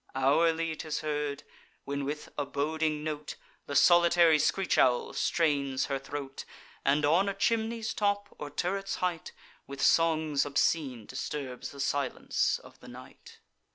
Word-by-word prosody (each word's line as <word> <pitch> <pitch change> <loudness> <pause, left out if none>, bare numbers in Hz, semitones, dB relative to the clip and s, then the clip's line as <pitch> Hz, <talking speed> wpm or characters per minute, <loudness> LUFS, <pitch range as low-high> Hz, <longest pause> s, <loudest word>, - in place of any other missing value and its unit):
Hourly 160 +4 +2
'tis 155 -1 -4
heard, 150 -2 -3 0.4
when 140 0 -3
with 150 +2 -5
a 145 - -1
boding 155 +2 -1
note 150 -1 -4 0.3
The 140 - -4
solitary 170 -2 +6
screech 195 +5 +1
owl 125 -1 +3
strains 140 -5 +1
her 135 -1 -2
throat, 135 0 -6 0.4
And, 145 +2 +2
on 175 +7 +3
a 200 - -3
chimney's 225 +1 0
top, 205 -2 -1
or 145 - -5
turret's 195 +6 -2
height, 175 -3 -2 0.4
With 140 0 -8
songs 155 -2 +3
obscene 140 -4 0
disturbs 130 -1 -5
the 140 - -12
silence 140 -1 0
of - - -16
the - - -14
night. - - -13
150 Hz, 140 wpm, -29 LUFS, 140-170 Hz, 0.4 s, solitary